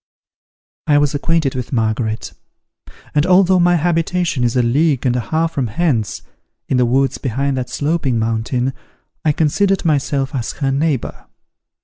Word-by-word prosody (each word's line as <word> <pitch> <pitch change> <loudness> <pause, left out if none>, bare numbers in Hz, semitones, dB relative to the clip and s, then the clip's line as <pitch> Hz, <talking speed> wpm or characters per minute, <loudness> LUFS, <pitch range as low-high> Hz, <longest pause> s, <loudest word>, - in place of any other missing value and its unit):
I 145 -2 +4
was 145 0 +2
acquainted 155 -1 0
with 125 -2 -5
Margaret: 110 -2 -1 0.8
and, 145 - +3
although 185 +1 +4
my 175 0 +4
habitation 170 -3 0
is 120 0 0
a 125 - +3
league 140 +3 +1
and 125 -1 +2
a - - +1
half 160 +7 -1
from 135 -6 -1
hence, 115 -3 -1 0.4
in 130 - +1
the 125 -1 +3
woods 135 +2 +1
behind 135 +2 -1
that 125 -1 -3
sloping 145 -5 -1
mountain, 115 +3 -1 0.5
I 155 - +3
considered 180 +6 +1
myself 140 -2 0
as 125 -4 -3
her 135 -2 -1
neighbour. 140 -2 -2
140 Hz, 150 wpm, -18 LUFS, 125-165 Hz, 0.8 s, I